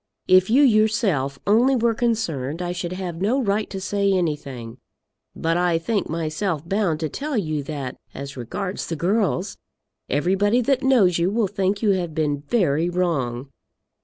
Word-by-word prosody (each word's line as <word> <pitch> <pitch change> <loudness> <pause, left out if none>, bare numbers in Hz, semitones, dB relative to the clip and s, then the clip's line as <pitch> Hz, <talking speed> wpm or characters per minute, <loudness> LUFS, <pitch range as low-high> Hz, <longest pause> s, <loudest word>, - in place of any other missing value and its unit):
If 185 +1 +5
you 265 +6 +5
yourself 215 - +2
only 235 +6 +4
were 235 -1 +2
concerned 180 - -1
I 175 -1 -2
should 180 0 -4
have 180 -2 -5
no 230 +8 +2
right 210 -3 0
to 195 - -5
say 200 +1 0
anything; 145 -10 -3 0.6
but 165 +1 0
I 175 -1 +2
think 200 +4 -1
myself 165 0 -2
bound 190 -6 0
to 160 - 0
tell 285 - -3
you 155 -7 -1
that, 140 -4 -5
as 140 0 -7
regards 180 - -4
the 165 - -3
girls, 190 +2 0 0.5
everybody 195 - +2
that 265 +2 +1
knows 225 -11 +4
you 170 +2 +2
will 220 +2 +1
think 195 +1 -1
you 210 - +4
to 190 - +1
have 170 -3 -5
been 145 -3 0
very 170 -7 +1
wrong. 140 -8 -1
180 Hz, 165 wpm, -23 LUFS, 155-210 Hz, 0.6 s, If